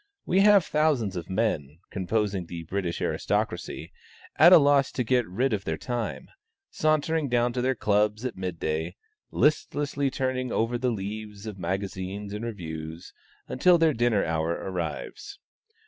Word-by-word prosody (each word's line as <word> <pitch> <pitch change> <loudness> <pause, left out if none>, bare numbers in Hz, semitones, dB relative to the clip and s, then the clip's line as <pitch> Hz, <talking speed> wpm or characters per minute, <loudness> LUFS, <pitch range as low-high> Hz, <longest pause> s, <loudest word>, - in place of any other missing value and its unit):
We 185 - +2
have 200 -2 +6
thousands 145 -11 +1
of 85 0 -6
men, 90 -8 -1
composing 100 -1 -1
the 85 -1 -6
British 85 -1 -3
aristocracy, - - -2 0.4
at 170 +3 +7
a - - +11
loss 140 -2 +4
to 125 - -1
get 125 0 +1
rid 120 +7 0
of 100 -2 -1
their 80 -3 -2
time; 120 0 -4 0.4
sauntering 155 -1 +1
down 120 0 +2
to 125 - -1
their 130 +1 +1
clubs 105 +2 +1
at 125 - -3
mid 90 -3 -5
day; 80 +1 -2 0.3
listlessly 145 -2 +1
turning 130 -1 -2
over 115 +2 0
the 125 0 +1
leaves 105 -1 -5
of 105 -3 -7
magazines 95 +2 -4
and 105 +2 -5
reviews, 80 -7 -7 0.3
until 175 +7 +4
their 160 -2 +3
dinner 120 -3 +2
hour 80 0 -1
arrives. 90 - -4
110 Hz, 150 wpm, -27 LUFS, 95-130 Hz, 0.4 s, a